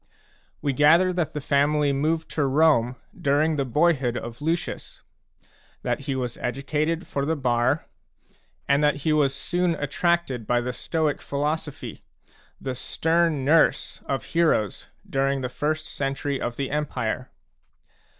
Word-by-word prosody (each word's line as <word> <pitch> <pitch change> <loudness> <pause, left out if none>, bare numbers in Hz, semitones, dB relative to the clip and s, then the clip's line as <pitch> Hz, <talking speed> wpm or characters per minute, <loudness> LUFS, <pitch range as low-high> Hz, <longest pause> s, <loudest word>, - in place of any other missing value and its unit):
We 140 -2 +1
gather 165 +7 +5
that 175 -3 -1
the 150 - -2
family 145 +1 +2
moved 160 +4 0
to 145 -3 +1
Rome 135 -4 +3 0.2
during 150 +3 +2
the 140 -2 0
boyhood 135 -3 +2
of 115 +2 -7
Lucius, 165 +3 -3 0.8
that - - 0
he 135 - 0
was 125 -2 -3
educated 150 +6 -1
for 140 - -2
the 160 +3 0
bar, 120 -4 +1 0.8
and 140 +1 +3
that 150 -1 +2
he 155 - +3
was 140 -3 +2
soon 175 +4 0
attracted 145 -4 0
by 120 - +3
the 125 +1 -3
Stoic 155 +3 -1
philosophy, 150 +1 -3 0.6
the 130 - -3
stern 160 +2 +1
nurse 160 +3 +3
of 135 -4 -1
heroes 160 - +1 0.2
during 135 0 0
the 125 - -2
first 155 +4 -2
century 140 0 -2
of 120 - -2
the 135 0 -3
Empire. 130 -5 -2
145 Hz, 140 wpm, -25 LUFS, 130-160 Hz, 0.8 s, gather